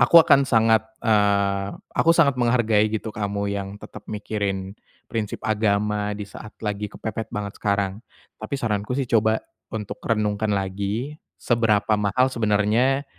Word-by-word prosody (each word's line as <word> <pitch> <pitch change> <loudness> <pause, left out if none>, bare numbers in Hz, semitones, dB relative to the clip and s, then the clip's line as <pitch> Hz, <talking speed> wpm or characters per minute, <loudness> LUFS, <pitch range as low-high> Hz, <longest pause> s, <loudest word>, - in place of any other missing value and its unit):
aku 125 +7 +6
akan 140 -3 +4
sangat, 110 -2 +3 0.2
eee, 100 -3 +2 0.2
aku 165 - +3
sangat 140 -6 +3
menghargai 115 -3 +3
gitu 110 0 -4
kamu 100 -1 -2
yang 100 0 -4
tetap - - -12
mikirin 100 -2 -3 0.3
prinsip 110 -3 -3
agama 105 -1 0
di 105 - -5
saat 105 +1 -11
lagi 105 0 -2
kepepet 110 +1 -5
banget 105 -1 -6
sekarang. 100 0 0 0.4
Tapi 110 +6 -3
saranku 110 0 -2
sih 135 - 0
coba 110 -2 +2 0.3
untuk 105 -2 -6
renungkan 105 -1 0
lagi, 100 +6 -2 0.2
seberapa 110 -3 +1
mahal 125 +6 +2
sebenarnya 115 +5 +2
105 Hz, 135 wpm, -23 LUFS, 100-115 Hz, 0.4 s, aku